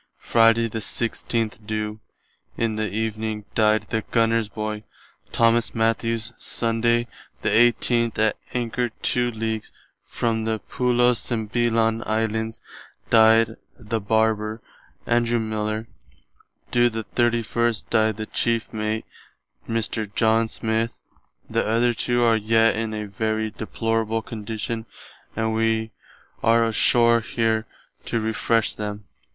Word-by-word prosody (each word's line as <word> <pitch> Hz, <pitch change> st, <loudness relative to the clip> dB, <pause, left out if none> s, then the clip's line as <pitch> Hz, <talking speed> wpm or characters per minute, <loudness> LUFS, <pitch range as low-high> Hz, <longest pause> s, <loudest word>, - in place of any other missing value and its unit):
Friday 115 Hz, 0 st, +4 dB
the 110 Hz, 0 st, -4 dB
16th 115 Hz, 0 st, -2 dB
do. 105 Hz, 0 st, -3 dB, 0.6 s
in 115 Hz, -2 st, 0 dB
the 110 Hz, 0 st, -1 dB
evening 110 Hz, 0 st, -3 dB
dyed 110 Hz, 0 st, +3 dB
the 110 Hz, -2 st, -2 dB
Gunner's 115 Hz, -2 st, +2 dB
boy, 105 Hz, 0 st, -4 dB, 0.5 s
Thomas 115 Hz, 0 st, +2 dB
Matthews. 115 Hz, 0 st, 0 dB
Sunday 115 Hz, +1 st, 0 dB, 0.4 s
the -, -, +2 dB
18th 120 Hz, 0 st, +3 dB
at 110 Hz, -1 st, +2 dB, 0.2 s
anchor 120 Hz, 0 st, -1 dB
two 120 Hz, +2 st, 0 dB
leagues 110 Hz, -1 st, -4 dB, 0.3 s
from 110 Hz, -1 st, -2 dB
the 110 Hz, 0 st, 0 dB
Pillo 125 Hz, +2 st, +2 dB
Sumbelong 115 Hz, -2 st, -2 dB, 0.5 s
[Pulo -, -, -7 dB
Sembîlan] -, -, -8 dB
Islands 110 Hz, 0 st, -1 dB, 0.5 s
dyed 115 Hz, 0 st, +5 dB, 0.2 s
the 110 Hz, +1 st, -3 dB
Barber, 110 Hz, +1 st, +1 dB, 0.5 s
Andrew 120 Hz, 0 st, +2 dB
Miller. 110 Hz, 0 st, -2 dB, 0.8 s
Do. 120 Hz, 0 st, +4 dB
the 110 Hz, -1 st, -4 dB
31st 120 Hz, -1 st, 0 dB
dyed 110 Hz, -2 st, +2 dB
the 110 Hz, -, -4 dB
Cheife 115 Hz, +1 st, -1 dB
Mate, 110 Hz, 0 st, -2 dB, 0.6 s
Mr. 110 Hz, -2 st, -1 dB
John 115 Hz, 0 st, +3 dB
Smith. 110 Hz, +1 st, -1 dB, 0.5 s
The -, -, 0 dB
other 115 Hz, +2 st, +2 dB
two 120 Hz, +1 st, +1 dB
are 115 Hz, -1 st, +4 dB
yet 115 Hz, +1 st, +3 dB
in 110 Hz, -1 st, -2 dB
a 105 Hz, 0 st, -4 dB
very 110 Hz, +2 st, -2 dB
deplorable 115 Hz, 0 st, -2 dB
condition 110 Hz, +1 st, -5 dB, 0.5 s
and 110 Hz, 0 st, 0 dB
wee 110 Hz, 0 st, 0 dB, 0.5 s
are 115 Hz, 0 st, +4 dB
ashore 115 Hz, +1 st, +4 dB
here 110 Hz, -1 st, -1 dB, 0.4 s
to 115 Hz, -, -1 dB
refresh 110 Hz, +1 st, +1 dB
them.... 105 Hz, 0 st, -5 dB
110 Hz, 125 wpm, -23 LUFS, 110-115 Hz, 0.8 s, dyed